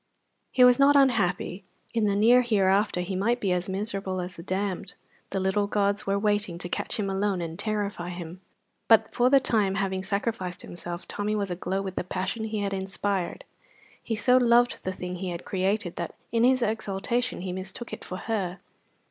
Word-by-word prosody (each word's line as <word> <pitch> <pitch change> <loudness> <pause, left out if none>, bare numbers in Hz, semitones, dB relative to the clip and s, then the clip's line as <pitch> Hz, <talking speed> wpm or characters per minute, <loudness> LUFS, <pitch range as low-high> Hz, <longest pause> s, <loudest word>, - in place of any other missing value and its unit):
He 255 - +5
was 250 +1 +7
not 280 +1 +6
unhappy; 205 -8 +2 0.3
in 225 -2 +2
the 200 - +1
near 235 +5 +6
hereafter 200 -4 +2
he 185 +2 -3
might 230 +6 +1
be 195 -5 0
as 180 +1 0
miserable 195 -1 -3
as 180 0 -5
the - - -9
damned 190 +1 -3 0.3
the 195 - -2
little 190 +2 +1
gods 200 0 0
were 200 0 +2
waiting 205 -3 0
to 175 - -5
catch 210 - -2
him 205 -3 -1
alone 195 0 0
and 165 -1 -5
terrify 205 -5 -2
him; 175 0 -7 0.5
but 220 -1 +5
for 245 +1 +3
the 275 +1 +6
time, 210 -7 +1
having 190 -1 -1
sacrificed 195 -2 -2
himself, 175 0 -7
Tommy 210 +1 -2
was 200 -3 -1
aglow 185 +2 -2
with 190 -1 -6
the - - 0
passion 190 +5 -3
he 215 -1 -2
had 200 -1 -1
inspired. 195 -1 -2 0.6
He 225 - -2
so 250 +3 +4
loved 240 0 +3
the 185 - 0
thing 180 -1 -5
he 185 0 -4
had 170 0 -6
created 190 -1 -1
that 170 - -4 0.2
in 230 0 +2
his 255 0 +4
exultation 225 +2 -1
he 185 -1 -4
mistook 190 +5 -5
it - - -6
for 185 - -6
her. 195 -5 -2
200 Hz, 190 wpm, -27 LUFS, 185-220 Hz, 0.6 s, was